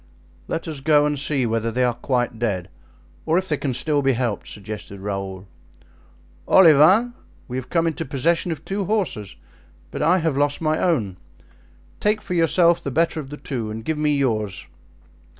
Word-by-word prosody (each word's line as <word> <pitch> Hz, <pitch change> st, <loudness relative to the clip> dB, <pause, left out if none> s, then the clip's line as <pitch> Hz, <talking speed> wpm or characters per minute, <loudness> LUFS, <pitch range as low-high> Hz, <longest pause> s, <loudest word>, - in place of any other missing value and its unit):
"Let 165 Hz, -, -3 dB
us 155 Hz, -3 st, -5 dB
go 145 Hz, +1 st, +4 dB
and 150 Hz, -1 st, -1 dB
see 140 Hz, -2 st, 0 dB
whether 115 Hz, 0 st, -1 dB
they 125 Hz, +3 st, 0 dB
are 125 Hz, -1 st, +2 dB
quite 120 Hz, -1 st, -2 dB
dead, 100 Hz, -7 st, -2 dB, 0.5 s
or 160 Hz, +2 st, +1 dB
if 190 Hz, 0 st, -1 dB
they 150 Hz, -, 0 dB
can 135 Hz, -3 st, -2 dB
still 145 Hz, +3 st, +1 dB
be 135 Hz, -1 st, +2 dB
helped," 120 Hz, -4 st, -2 dB
suggested 105 Hz, -1 st, -8 dB
Raoul. 95 Hz, -1 st, -5 dB, 1.0 s
"Olivain, 185 Hz, -, +6 dB, 0.3 s
we 125 Hz, -, -4 dB
have 130 Hz, -, -6 dB
come 165 Hz, -1 st, +1 dB
into 165 Hz, 0 st, -1 dB
possession 165 Hz, +5 st, 0 dB
of 160 Hz, -1 st, -6 dB
two 195 Hz, 0 st, -2 dB
horses, 180 Hz, -, -2 dB, 0.6 s
but -, -, -5 dB
I 165 Hz, +5 st, +4 dB
have 160 Hz, -5 st, 0 dB
lost 145 Hz, +1 st, +1 dB
my 155 Hz, -1 st, 0 dB
own. 110 Hz, -, 0 dB, 0.8 s
Take 210 Hz, +1 st, +1 dB
for 200 Hz, -3 st, -6 dB
yourself 170 Hz, 0 st, +3 dB
the -, -, -4 dB
better 165 Hz, +4 st, +1 dB
of 135 Hz, -3 st, -7 dB
the 150 Hz, -, -7 dB
two 120 Hz, -8 st, -4 dB
and 110 Hz, +1 st, -7 dB
give 160 Hz, -1 st, -2 dB
me 150 Hz, -1 st, +2 dB
yours." 110 Hz, -8 st, -1 dB
145 Hz, 180 wpm, -22 LUFS, 115-165 Hz, 1.0 s, Olivain